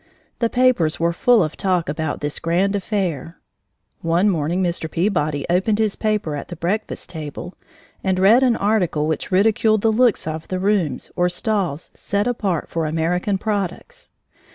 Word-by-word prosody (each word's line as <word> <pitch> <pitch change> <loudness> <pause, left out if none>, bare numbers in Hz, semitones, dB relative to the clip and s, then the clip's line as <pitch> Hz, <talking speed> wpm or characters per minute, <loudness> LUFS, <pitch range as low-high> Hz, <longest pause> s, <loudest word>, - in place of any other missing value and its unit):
The 230 - +1
papers 245 -12 +2
were 170 +1 +1
full 235 +3 +4
of 155 - -4
talk 180 -3 0
about 155 0 -3
this 145 0 -3
grand 185 +5 +1
affair. 180 - -2 0.6
One 170 +5 +2
morning 170 +2 0
Mr. 170 -2 -2
Peabody 155 -5 0
opened 190 +5 +1
his 215 -2 0
paper 210 -8 -1
at 145 - -6
the 175 - -7
breakfast 190 +7 -3
table 160 +2 -7 0.5
and 190 -1 +1
read 205 +7 +5
an 250 -3 +3
article 195 -8 +1
which 155 +4 -2
ridiculed 215 +2 +3
the 225 - +3
looks 235 -1 +2
of 160 0 -5
the 185 - -2
rooms 185 -8 0
or 175 0 +2
stalls 180 -5 -2
set 200 0 -2
apart 205 -9 -1
for 165 -2 -2
American 175 +5 0
products. 205 - -4
185 Hz, 160 wpm, -21 LUFS, 165-210 Hz, 0.6 s, read